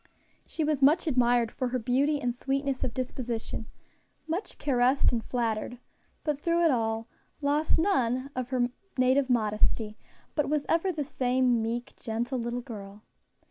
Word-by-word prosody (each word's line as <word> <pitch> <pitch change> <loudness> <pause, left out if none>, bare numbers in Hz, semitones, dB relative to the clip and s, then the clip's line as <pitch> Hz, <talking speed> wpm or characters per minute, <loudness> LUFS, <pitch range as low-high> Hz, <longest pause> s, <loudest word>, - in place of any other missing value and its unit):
She 320 - -2
was 300 -2 0
much 305 +6 +5
admired 245 -5 +3
for 255 - -2
her 250 +1 -1
beauty 270 +5 +1
and 245 -3 -1
sweetness 275 +1 -1
of 245 - -1
disposition, 240 -3 -4 0.6
much 340 +6 -3
caressed 260 0 +3
and 235 -2 -1
flattered, 235 0 -2 0.5
but, 300 -3 -1
through 340 +1 +2
it 325 - +5
all, 225 -2 0 0.3
lost 295 +2 +2
none 265 - +1
of 250 -1 -3
her 250 -2 +1 0.3
native 260 +1 +3
modesty, 215 -1 +1 0.3
but 295 -2 0
was 300 -1 0
ever 335 +3 +2
the 305 -4 -2
same 255 -3 +1
meek, 240 +3 -3
gentle 240 +3 -2
little 240 +1 -2
girl. 210 -4 -9
255 Hz, 150 wpm, -28 LUFS, 235-285 Hz, 0.6 s, much